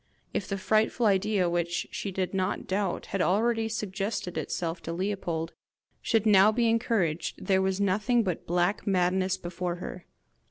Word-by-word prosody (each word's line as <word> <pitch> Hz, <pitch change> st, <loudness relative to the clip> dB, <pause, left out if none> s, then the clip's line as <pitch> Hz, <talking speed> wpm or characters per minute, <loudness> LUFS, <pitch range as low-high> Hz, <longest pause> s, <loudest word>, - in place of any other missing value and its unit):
If 195 Hz, -, -2 dB
the 200 Hz, -, -2 dB
frightful 215 Hz, +4 st, +1 dB
idea 200 Hz, -2 st, +2 dB
which, 170 Hz, 0 st, -1 dB
she 200 Hz, -, -4 dB
did 185 Hz, 0 st, -2 dB
not 190 Hz, 0 st, -1 dB
doubt, 195 Hz, 0 st, -1 dB
had 195 Hz, -, +1 dB
already 225 Hz, +4 st, +2 dB
suggested 200 Hz, -3 st, -3 dB
itself 170 Hz, 0 st, -3 dB
to 165 Hz, -, -5 dB
Leopold, 175 Hz, -3 st, -2 dB, 0.5 s
should 225 Hz, -2 st, +1 dB
now 205 Hz, 0 st, +6 dB
be 235 Hz, +1 st, +1 dB
encouraged, 200 Hz, -8 st, 0 dB
there 190 Hz, -1 st, +3 dB
was 190 Hz, 0 st, 0 dB
nothing 210 Hz, +5 st, +2 dB
but 180 Hz, -5 st, -3 dB
black 175 Hz, +5 st, 0 dB
madness 185 Hz, 0 st, +2 dB
before 175 Hz, -1 st, -4 dB
her! 180 Hz, 0 st, -8 dB
190 Hz, 155 wpm, -28 LUFS, 180-210 Hz, 0.5 s, now